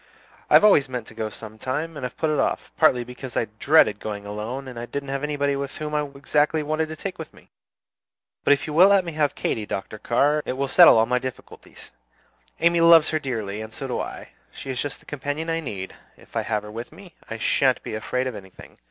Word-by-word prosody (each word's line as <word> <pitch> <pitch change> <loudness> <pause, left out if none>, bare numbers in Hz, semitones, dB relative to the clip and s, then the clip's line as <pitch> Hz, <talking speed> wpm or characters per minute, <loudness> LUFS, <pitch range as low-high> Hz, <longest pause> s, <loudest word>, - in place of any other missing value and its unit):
"I - - +6
have - - +8
always 145 -10 +5
meant 125 -3 -4
to - - -13
go 110 -1 -3
some 110 0 -10
time, 150 +7 -3
and 140 - -7
have 125 - -5
put 160 -1 0
it 150 - 0
off, - - -1
partly 125 -1 +4
because 125 +1 -8
I - - +2
dreaded 140 -9 +4
going 105 -1 -6
alone, 110 +6 -5
and 120 -2 -8
didn't 140 0 -3
know 135 0 -2
anybody 145 -1 0
whom 140 +2 -4
I 150 0 +1
exactly 150 +2 +1
wanted 155 +1 -1
to 160 - -6
take 185 +3 -6
with 160 - -7
me. - - -20 0.9
But - - +6
if 140 - -2
you 150 - -5
will 180 +5 +7
let 200 -2 +4
me 170 - -4
have 150 -2 0
Katy, 105 -2 -2
Dr. 105 +2 -5
Carr, 145 +7 +2
it - - -3
will 135 +1 -2
settle 130 - +8
all 110 - +4
my 125 +2 +1
difficulties. 130 0 -9 0.7
Amy 170 0 +3
loves 165 -2 +7
her 155 - +1
dearly, 110 -7 -4
and 110 0 -8
so 135 +2 -6
do 125 - -2
I; - - -6 0.2
she 135 - -7
is 125 - -2
just 145 -1 -5
the - - -23
companion 145 +3 -4
I 165 - 0
need; 100 -11 -6 0.2
if - - -20
I - - +1
have 105 -2 -2
her 105 - -9
with 115 +2 -7
me, 190 -4 -14 0.2
I 115 - -4
sha'n't 130 +3 +2
be - - -6
afraid 125 +4 -2
of 130 - -3
anything. 95 -3 -13
135 Hz, 235 wpm, -24 LUFS, 115-150 Hz, 0.9 s, have